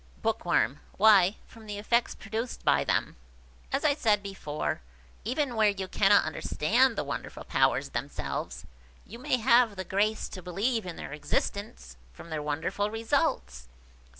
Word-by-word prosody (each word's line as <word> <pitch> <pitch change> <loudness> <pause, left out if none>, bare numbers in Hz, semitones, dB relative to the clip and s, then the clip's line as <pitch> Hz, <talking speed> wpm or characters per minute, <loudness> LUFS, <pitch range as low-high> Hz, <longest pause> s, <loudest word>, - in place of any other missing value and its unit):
Bookworm. 135 +5 +1 0.2
"Why, 200 -2 +6
from 225 -1 -15
the 205 -1 -5
effects 235 +3 +1
produced 225 +3 -5
by - - +4
them. - - -1 0.5
As 280 - 0
I 295 - +5
said 215 -7 +2
before, 170 - -4 0.4
even 255 +2 -1
where 215 -1 +4
you 195 -2 -3
cannot 200 +2 +4
understand 225 - +1
the - - -1
wonderful 140 -4 -6
powers - - +1
themselves, - - -4 0.4
you 235 - -11
may 260 0 +1
have 235 -2 +4
the 190 - -4
grace 210 +4 0
to 185 - -8
believe 200 +5 -1
in 175 - -5
their - - -7
existence, 150 - -3 0.2
from 170 - -12
their 155 -1 -2
wonderful 160 +7 -2
results." 225 - -1
205 Hz, 150 wpm, -28 LUFS, 180-230 Hz, 0.5 s, Why